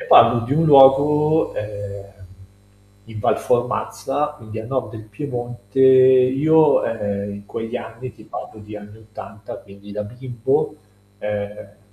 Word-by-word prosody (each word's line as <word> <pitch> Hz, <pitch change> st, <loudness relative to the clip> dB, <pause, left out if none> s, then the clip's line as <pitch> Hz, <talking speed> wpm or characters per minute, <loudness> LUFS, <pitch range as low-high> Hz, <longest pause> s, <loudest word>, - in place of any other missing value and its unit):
e -, -, -8 dB
parlo 120 Hz, -, +6 dB
di 115 Hz, +4 st, -4 dB
un 160 Hz, +3 st, +2 dB
luogo, 150 Hz, +2 st, +5 dB
ehm, 100 Hz, -1 st, -7 dB, 1.0 s
in 110 Hz, 0 st, -10 dB
Val -, -, +1 dB
Formazza, 125 Hz, +5 st, -2 dB
quindi 110 Hz, -2 st, -9 dB
a -, -, -9 dB
nord 130 Hz, +2 st, -3 dB
del 110 Hz, -, -9 dB
Piemonte, 120 Hz, -1 st, -6 dB
io, 130 Hz, +4 st, +5 dB
ehm, 100 Hz, -2 st, -3 dB
in 100 Hz, 0 st, -12 dB
quegli 115 Hz, 0 st, -5 dB
anni 115 Hz, +2 st, -9 dB
ti -, -, -17 dB
parlo 110 Hz, -, -9 dB
di 105 Hz, 0 st, -10 dB
anni 105 Hz, +1 st, -13 dB
80, 105 Hz, -1 st, -11 dB
quindi 100 Hz, +1 st, -14 dB
da 105 Hz, -, -4 dB
bimbo, 125 Hz, +3 st, -3 dB, 0.4 s
ehm 105 Hz, -1 st, -6 dB
115 Hz, 140 wpm, -20 LUFS, 105-130 Hz, 1.0 s, parlo